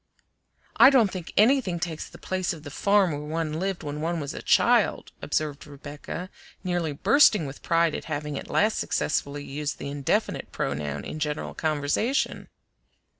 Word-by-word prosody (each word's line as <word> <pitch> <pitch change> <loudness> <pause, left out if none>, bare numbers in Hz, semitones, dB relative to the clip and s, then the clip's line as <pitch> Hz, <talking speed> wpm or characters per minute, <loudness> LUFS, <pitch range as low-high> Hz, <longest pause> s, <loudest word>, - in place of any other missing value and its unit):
"I 270 - +9
don't 240 -8 +4
think 180 -3 -6
anything 215 -6 +4
takes 160 -2 -4
the - - -13
place 185 -1 -2
of 155 -3 -11
the 145 - -8
farm 200 +2 +3
where 145 - -3
one 155 +1 -3
lived 190 0 -2
when 150 0 -5
one 170 +1 -1
was 140 -2 -4
a - - -6
child," - - +3
observed 150 -1 -2
Rebecca, 145 +5 -8 0.3
nearly 175 -4 -1
bursting 210 - +4
with 135 0 -8
pride 165 -1 +2
at - - -5
having 150 -1 -4
at - - -6
last 215 +1 +2
successfully 145 -1 -1
used 145 +1 -4
the 140 - -6
indefinite 140 -1 -1
pronoun 75 0 -3
in 155 - -6
general 150 0 -3
conversation. 155 - -1
155 Hz, 165 wpm, -26 LUFS, 145-185 Hz, 0.3 s, I